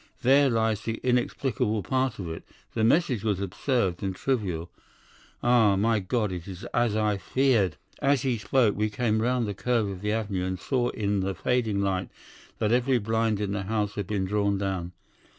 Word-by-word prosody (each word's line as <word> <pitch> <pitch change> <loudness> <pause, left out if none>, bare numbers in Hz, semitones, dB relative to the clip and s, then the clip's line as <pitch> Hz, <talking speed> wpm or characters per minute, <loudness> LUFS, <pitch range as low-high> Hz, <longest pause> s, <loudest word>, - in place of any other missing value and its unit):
There 135 +2 +5
lies 110 -3 +1
the 115 0 -3
inexplicable 120 -4 0
part 130 +2 0
of 95 - -5
it. 80 0 -6 0.3
The 110 - 0
message 130 - +2
was 105 -4 0
absurd 100 -1 -1
and 95 -1 -2
trivial. 90 -10 -2 0.7
Ah, 115 -5 +5
my 110 +3 +2
God, 105 +2 -1
it 90 -1 -6
is 95 +1 -8
as 120 -3 +2
I 105 -1 +1
feared!' 115 - +1 0.2
"As 140 -2 +2
he 125 -4 0
spoke 115 -1 +2
we 105 +1 0
came 110 0 0
round 125 0 +1
the 100 - -2
curve 115 +1 0
of 95 -2 -6
the 105 0 -1
avenue, 100 -4 -1
and 95 -1 -3
saw 125 +1 0
in 105 -1 -1
the 95 0 -2
fading 115 -1 0
light 95 -1 -1 0.5
that 105 - 0
every 125 +2 +3
blind 110 -1 0
in 105 -2 -2
the 100 0 -2
house 105 +1 -1
had 100 -3 -4
been 100 -3 -1
drawn 100 0 +1
down. 95 -3 -3
105 Hz, 185 wpm, -27 LUFS, 100-120 Hz, 0.7 s, There